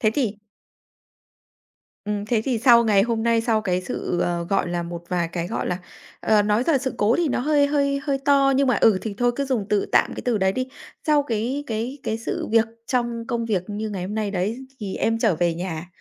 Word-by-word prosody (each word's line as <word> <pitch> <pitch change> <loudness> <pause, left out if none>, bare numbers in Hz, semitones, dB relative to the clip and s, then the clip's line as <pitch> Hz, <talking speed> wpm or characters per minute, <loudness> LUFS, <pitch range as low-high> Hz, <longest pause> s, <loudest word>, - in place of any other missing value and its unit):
Thế 215 - +3
thì 225 -8 0 1.7
Ừm, 205 0 -2
thế 220 -1 +1
thì 250 -4 0
sau 235 0 +6
ngày 205 -3 +4
hôm 225 0 -1
nay, 230 0 +3
sau 225 -1 +1
cái 185 -3 0
sự, 175 0 -3
ờ, 175 -1 -1
gọi 195 -2 +1
là, 175 0 -2
một 170 0 -6
vài 175 -2 0
cái, 170 -1 -2
gọi - - -3
là, 180 - -1 0.4
ờ, 215 -1 +3
nói 210 +3 +2
là 315 -5 +4
sự 260 0 -3
cố 215 +4 +3
thì 345 -2 +1
nó - - 0
hơi 290 +1 +3
hơi 280 -1 +1
hơi 275 -1 0
to, 275 0 +3
nhưng 275 +1 +3
mà, 250 - +3
ừ, 210 -4 +4
thì 215 -1 -4
thôi 245 0 +2
cứ 280 - 0
dùng 250 -7 -1
từ 210 -1 +1
tạm - - +3
cái - - -6
từ 240 -4 +1
đấy 190 -1 +2
đi. 255 +4 -3 0.4
Sau 300 -2 +4
cái 250 +3 -2
cái 235 +5 -3
cái 220 - -2
sự 230 - -3
việc 225 0 +5 0.2
trong 240 -2 -1
công 235 0 -2
việc 205 -6 0
như 215 +1 -3
ngày 195 -3 -4
hôm 200 +3 -5
nay 215 -2 -1
đấy 200 +5 -2 0.2
thì 195 -3 -4
em 225 0 0
trở 220 -5 +2
về 170 0 +1
nhà, 170 -1 -5
225 Hz, 235 wpm, -23 LUFS, 195-255 Hz, 1.7 s, sau